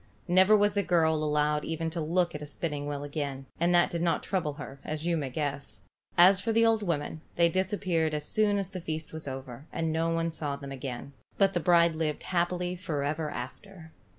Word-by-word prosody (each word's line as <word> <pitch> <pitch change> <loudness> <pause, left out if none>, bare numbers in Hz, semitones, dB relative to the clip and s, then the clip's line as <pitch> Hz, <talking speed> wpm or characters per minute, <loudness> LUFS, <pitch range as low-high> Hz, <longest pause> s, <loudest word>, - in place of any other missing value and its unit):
Never 185 +4 +6
was 205 0 +3
the 200 - +2
girl 165 -4 +3
allowed 150 0 +1
even 160 0 -2
to 170 0 -3
look 170 +3 +1
at 150 - -6
a 150 - -6
spinning 145 -1 -3
wheel 145 -1 -3
again; 140 -2 -4
and 170 +1 +3
that 175 - +4
did 170 - -2
not 170 -1 +1
trouble 175 -7 -1
her, 140 -2 -9
as 155 +1 -4
you 170 -1 +2
may 145 -4 -2
guess. 140 - -4 0.3
As 185 +2 +7
for 225 - 0
the 230 +1 +4
old 225 -1 +3
women, 160 -4 -2
they 170 0 +4
disappeared 180 -4 0
as 150 0 -3
soon 210 +2 +2
as 195 -1 -3
the 185 -3 -6
feast 160 -2 -5
was 160 -2 -5
over, 130 +1 -7
and 165 -1 -1
no 165 +1 +1
one 165 0 0
saw 150 -3 -3
them 140 0 -8
again, 135 0 -6 0.2
but 195 -1 +4
the 175 - +1
bride 170 0 +4
lived 155 -1 -2
happy 180 0 0
forever 155 -3 -2
after. 160 +7 -8
160 Hz, 210 wpm, -29 LUFS, 150-180 Hz, 0.3 s, As